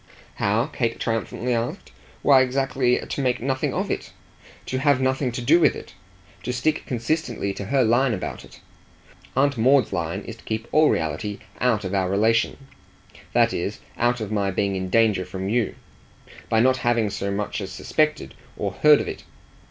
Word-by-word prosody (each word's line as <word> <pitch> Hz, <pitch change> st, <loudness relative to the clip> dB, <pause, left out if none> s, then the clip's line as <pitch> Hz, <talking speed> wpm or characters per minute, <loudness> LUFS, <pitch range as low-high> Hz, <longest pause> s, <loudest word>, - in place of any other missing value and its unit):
"How?" 105 Hz, +4 st, +1 dB
Kate 120 Hz, -6 st, -2 dB
triumphantly 115 Hz, +2 st, -2 dB
asked. 115 Hz, +1 st, -3 dB, 0.3 s
"Why 135 Hz, -2 st, +6 dB
exactly 130 Hz, -1 st, +1 dB
to -, -, -4 dB
make 125 Hz, -2 st, +1 dB
nothing 130 Hz, +1 st, -1 dB
of -, -, -2 dB
it, -, -, -4 dB, 0.5 s
to 130 Hz, -, -2 dB
have 140 Hz, -1 st, +3 dB
nothing 130 Hz, 0 st, 0 dB
to 120 Hz, -, -4 dB
do 160 Hz, +8 st, +5 dB
with 165 Hz, -, +4 dB
it, -, -, -10 dB, 0.5 s
to -, -, -3 dB
stick 140 Hz, +6 st, -1 dB
consistently 125 Hz, -4 st, -2 dB
to 100 Hz, -, -6 dB
her 135 Hz, +5 st, +2 dB
line 120 Hz, +3 st, +3 dB
about 90 Hz, -, -6 dB
it. -, -, -16 dB, 0.7 s
Aunt 140 Hz, -2 st, +2 dB
Maud's 130 Hz, +1 st, +4 dB
line 85 Hz, +3 st, -2 dB
is 115 Hz, +2 st, -9 dB
to -, -, -18 dB
keep 110 Hz, +1 st, -4 dB
all 155 Hz, 0 st, +5 dB
reality 80 Hz, +6 st, -2 dB, 0.2 s
out 115 Hz, -4 st, +2 dB
of 95 Hz, 0 st, -4 dB
our 95 Hz, -2 st, +1 dB
relation 110 Hz, +4 st, +2 dB, 0.8 s
that -, -, +3 dB
is -, -, -3 dB, 0.2 s
out 120 Hz, +1 st, +1 dB
of 110 Hz, -2 st, -5 dB
my 100 Hz, -2 st, 0 dB
being 100 Hz, +1 st, -1 dB
in 95 Hz, -1 st, -3 dB
danger 110 Hz, -2 st, +3 dB
from 95 Hz, +1 st, -5 dB
you 115 Hz, +1 st, 0 dB, 0.7 s
by 110 Hz, -, +3 dB
not 130 Hz, +2 st, +4 dB
having 120 Hz, -4 st, +1 dB
so 100 Hz, -, -3 dB
much 105 Hz, +2 st, -3 dB
as 95 Hz, -1 st, -6 dB
suspected 150 Hz, -, -1 dB, 0.2 s
or -, -, -2 dB
heard 150 Hz, -1 st, +5 dB
of -, -, -5 dB
it. -, -, -6 dB
120 Hz, 180 wpm, -23 LUFS, 100-130 Hz, 0.8 s, Why